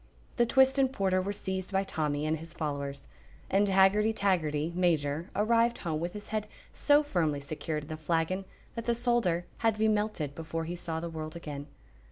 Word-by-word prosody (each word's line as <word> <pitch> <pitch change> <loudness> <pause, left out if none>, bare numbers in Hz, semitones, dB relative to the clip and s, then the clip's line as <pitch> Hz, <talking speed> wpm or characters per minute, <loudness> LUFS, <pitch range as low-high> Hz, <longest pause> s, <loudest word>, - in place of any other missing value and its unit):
The 240 -1 +4
twist 265 +2 +4
and 265 -1 +3
porter 190 -6 +1
were 195 +2 -2
seized 190 -1 -4
by 195 0 +2
Tommy 150 -5 -1
and 155 +1 +1
his 165 +2 -9
followers, 140 -3 -4 0.4
and 200 +1 +3
Haggerty 195 +3 +4
Taggerty, 165 -6 0
Major, 165 -2 +1
arrived 230 +3 +3
home 160 -3 -2
with 175 +2 -3
his 210 -1 -8
head 215 -1 -2 0.3
so 290 0 +4
firmly 160 - 0
secured 150 +1 -4
in 150 - -12
the 155 - -4
flagon 165 +4 0 0.3
that 230 -1 -5
the 235 - +3
solder 235 -8 +1
had 225 -2 +2
to - - -12
be 220 - +4
melted 210 -9 0
before 165 +1 -4
he 175 +2 -4
saw 165 -2 -4
the 170 +1 -4
world 155 0 -6
again. 145 -4 -6
175 Hz, 195 wpm, -30 LUFS, 155-210 Hz, 0.4 s, The